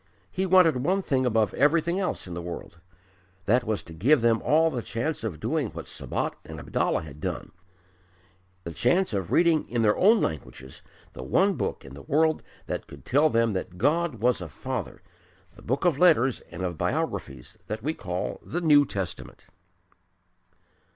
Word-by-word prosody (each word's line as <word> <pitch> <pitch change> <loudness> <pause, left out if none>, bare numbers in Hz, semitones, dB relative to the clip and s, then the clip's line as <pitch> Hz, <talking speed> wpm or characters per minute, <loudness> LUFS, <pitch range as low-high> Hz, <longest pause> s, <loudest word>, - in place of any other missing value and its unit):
He 190 +1 -1
wanted 180 -6 +5
one 185 +10 0
thing 130 -5 +1
above 110 -4 +1
everything 165 +5 +2
else 190 - -2
in 90 - -7
the 85 - -5
world: 85 0 -8 0.7
that 120 +4 +3
was 110 -2 -2
to 80 - -12
give 125 - +3
them 115 -1 +3
all 160 +2 +3
the 125 -4 -3
chance 125 +5 -3
of 95 -9 -4
doing - - -1
what - - -8
Sabat - - -3
and - - -9
Abdallah - - -1
had 75 -1 -11
done - - -4 1.1
the 85 - -6
chance 150 - +2
of 95 -4 -2
reading 170 -3 +3
in 120 -1 0
their 105 -1 +4
own 215 +4 +5
languages 65 -4 -5 0.3
the - - -8
one 190 - +2
book - - -4
in 65 - -11
the 70 - -10
world 155 - +1 0.2
that - - -4
could - - -13
tell 145 +5 +3
them 115 -4 +2
that 90 -1 -5
God 150 - +1
was 125 -4 +2
a 90 - -6
Father - - -5 0.5
the - - -15
book 130 +9 -2
of 160 -5 +2
letters 135 -8 +4
and 85 +2 -6
of 85 -3 -3
biographies 65 -2 -3
that 110 +1 -5
we 155 +3 -1
call 90 - -4
the 175 - -3
New 145 -4 +5
Testament. 85 -11 -6
125 Hz, 180 wpm, -26 LUFS, -, 1.1 s, wanted